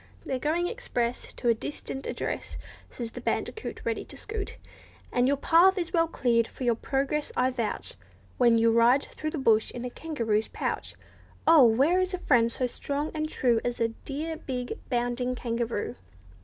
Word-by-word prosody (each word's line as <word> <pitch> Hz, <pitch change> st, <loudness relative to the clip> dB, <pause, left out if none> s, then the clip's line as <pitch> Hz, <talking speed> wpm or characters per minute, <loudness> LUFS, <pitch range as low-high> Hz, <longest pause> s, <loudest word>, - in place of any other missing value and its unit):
"They're 260 Hz, -, -2 dB
going 325 Hz, +5 st, +1 dB
express 245 Hz, -, -2 dB
To 245 Hz, -, -4 dB
a -, -, +6 dB
distant 270 Hz, +3 st, -5 dB
address," -, -, -4 dB, 0.3 s
Says 235 Hz, -2 st, -6 dB
the -, -, -8 dB
bandicoot, 440 Hz, -, -3 dB
ready -, -, -1 dB
to -, -, -12 dB
scoot; 425 Hz, -2 st, -5 dB, 0.5 s
And 245 Hz, +1 st, +3 dB
your 280 Hz, +1 st, +2 dB
path 345 Hz, +7 st, +5 dB
is 345 Hz, 0 st, -2 dB
well 330 Hz, -1 st, +3 dB
cleared 235 Hz, -7 st, +2 dB
for -, -, -8 dB
your 240 Hz, -1 st, +3 dB
progress, 275 Hz, +5 st, -1 dB
I 255 Hz, +1 st, +3 dB
vouch, 235 Hz, -4 st, -3 dB, 0.5 s
When 235 Hz, -2 st, +5 dB
you 230 Hz, 0 st, +4 dB
ride 235 Hz, +4 st, +5 dB
through 310 Hz, -, -5 dB
the 310 Hz, -, -4 dB
bush 225 Hz, -5 st, +3 dB
in 245 Hz, 0 st, -6 dB
a 250 Hz, -, -4 dB
kangaroo's 230 Hz, -10 st, -1 dB
pouch. -, -, -3 dB, 0.5 s
Oh! 320 Hz, -5 st, +8 dB
where 275 Hz, +11 st, +4 dB
is 370 Hz, 0 st, 0 dB
a -, -, -4 dB
friend 235 Hz, -9 st, +3 dB
so 255 Hz, -, 0 dB
strong 285 Hz, +4 st, -3 dB
and 310 Hz, 0 st, -2 dB
true 240 Hz, -6 st, +2 dB
As 245 Hz, 0 st, -2 dB
a 230 Hz, -, +2 dB
dear 300 Hz, +7 st, -5 dB
big, 250 Hz, -4 st, -4 dB
bounding 245 Hz, 0 st, 0 dB
kangaroo? 235 Hz, -1 st, -2 dB
255 Hz, 180 wpm, -28 LUFS, 235-310 Hz, 0.5 s, Oh